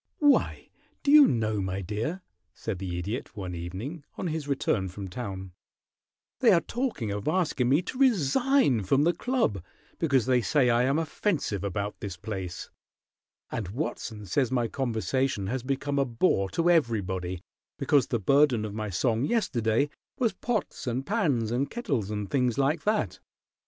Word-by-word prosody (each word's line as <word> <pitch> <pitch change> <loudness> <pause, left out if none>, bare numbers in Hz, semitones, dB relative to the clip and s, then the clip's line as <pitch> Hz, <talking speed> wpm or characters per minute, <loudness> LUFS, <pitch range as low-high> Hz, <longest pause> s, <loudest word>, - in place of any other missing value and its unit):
"Why, 290 -2 +2 0.3
do 285 - +3
you 295 -1 +9
know, 110 -3 0
my 95 +1 -2
dear," 110 - -3 0.3
said 100 -5 -4
the 90 -2 -4
Idiot 105 +7 -4
one 95 -3 -4
evening, 95 - -6
on - - -4
his 155 -2 -3
return 110 -8 0
from 95 +2 -7
town, 95 -2 -6 0.9
"they - - +6
are 170 - +5
talking 235 - -2
of 100 0 -4
asking 155 -7 +1
me 145 +7 +3
to 255 - -6
resign 245 - +3
from 135 +10 +3
the 170 +2 +3
club 170 - 0 0.4
because 135 -7 +2
they 125 -1 +3
say 125 0 +3
I 120 +1 +3
am 135 +3 +2
offensive 160 - -1
about 100 +1 -3
this 95 -4 -6
place, 95 -2 -6 0.8
and 105 -5 -3
Watson 110 - -4
says 125 +6 0
my 120 -3 +1
conversation 130 -2 -1
has 125 +6 -2
become 140 +2 -1
a 140 - +3
bore 115 - +1
to 170 - 0
everybody 95 - +1 0.3
because 140 -5 +3
the 120 - 0
burden 130 0 +3
of 105 - -5
my 110 0 -3
song 115 +5 +1
yesterday 130 - +1 0.3
was 240 -5 +1
pots 220 - -3
and 125 +2 -1
pans 145 - +1
and 135 +4 0
kettles 135 - -2
and 105 -1 -3
things 125 -3 +1
like 140 +4 +1
that?" 215 0 0
125 Hz, 160 wpm, -28 LUFS, 105-155 Hz, 0.9 s, you